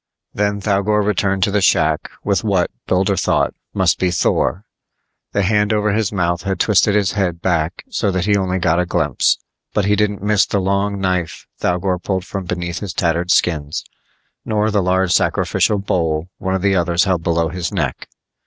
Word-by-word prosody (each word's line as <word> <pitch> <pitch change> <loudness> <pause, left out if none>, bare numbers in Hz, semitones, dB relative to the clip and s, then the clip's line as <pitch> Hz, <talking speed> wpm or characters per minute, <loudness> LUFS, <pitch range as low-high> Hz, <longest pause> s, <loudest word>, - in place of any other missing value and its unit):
Then 100 0 0
Thougor 105 +1 +1
returned 95 -1 0
to 105 - +1
the 105 0 +1
shack - - +2
with 100 -1 0
what, 95 -5 +1 0.2
Builder 95 +2 +2
thought, - - +1 0.2
must - - +1
be 90 - +2
Thor. 90 +2 0 0.7
The 100 - 0
hand 105 +2 +2
over 105 -1 +1
his 110 -2 0
mouth 85 -3 0
had 95 -2 -3
twisted 105 0 +3
his 100 -3 +2
head 90 -5 -1
back 85 -2 -1
so 190 - -1
that 95 -2 -1
he 105 -1 +3
only 95 -2 0
got 85 -1 +1
a 90 - +1
glimpse, - - +1 0.4
but 105 - +2
he 105 +1 +3
didn't 105 -2 -1
miss 105 -1 +3
the 100 - 0
long 100 +1 0
knife 90 -3 -2
Thougor 90 +1 0
pulled 95 0 -2
from 95 -1 -5
beneath 85 -1 -3
his 100 -3 -5
tattered 85 0 0
skins, 75 -5 +1 0.6
nor 110 0 0
the 100 -1 +2
large 95 0 +1
sacrificial 105 - +2
bowl 85 -4 -1
one 95 0 -1
of 95 - -2
the 100 -1 +3
others 85 -1 +2
held 95 -4 0
below 85 0 0
his 90 0 -4
neck. - - -3
95 Hz, 185 wpm, -18 LUFS, 90-100 Hz, 0.7 s, twisted